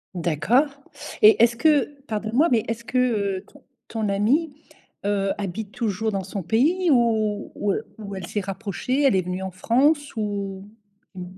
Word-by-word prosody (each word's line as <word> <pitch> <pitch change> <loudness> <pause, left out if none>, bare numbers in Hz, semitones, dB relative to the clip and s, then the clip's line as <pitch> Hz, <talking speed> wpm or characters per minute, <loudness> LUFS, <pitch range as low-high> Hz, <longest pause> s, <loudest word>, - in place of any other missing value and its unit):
D'accord, 180 - +2 0.6
et 220 +1 +8
est-ce 235 0 +4
que 295 0 +2
pardonne 220 0 -3
moi, 310 +5 +5
mais 225 -3 +3
est-ce 230 +1 -4
que, 255 - -3
heu, 200 -6 0
ton 285 -2 -19 0.2
ton 220 -2 -2
amie, 265 +11 +1 0.5
heu, 195 -1 +1
habite 200 +2 -4
toujours 220 -1 -2
dans 195 -2 -2
son 195 +1 -5
pays 310 - +2
ou 220 -5 +1
ou 205 - 0
e - - -1 0.2
ou 200 -2 -7
elle 185 -2 -6
s'est 210 - -2
rapprochée, 200 +7 -3
elle 270 -7 +4
est 185 - +2
venue 180 +1 -3
en 190 - -3
France 280 - +1
ou? 200 -2 -4 0.5
Mmh. 180 - -6
215 Hz, 175 wpm, -23 LUFS, 195-250 Hz, 0.6 s, et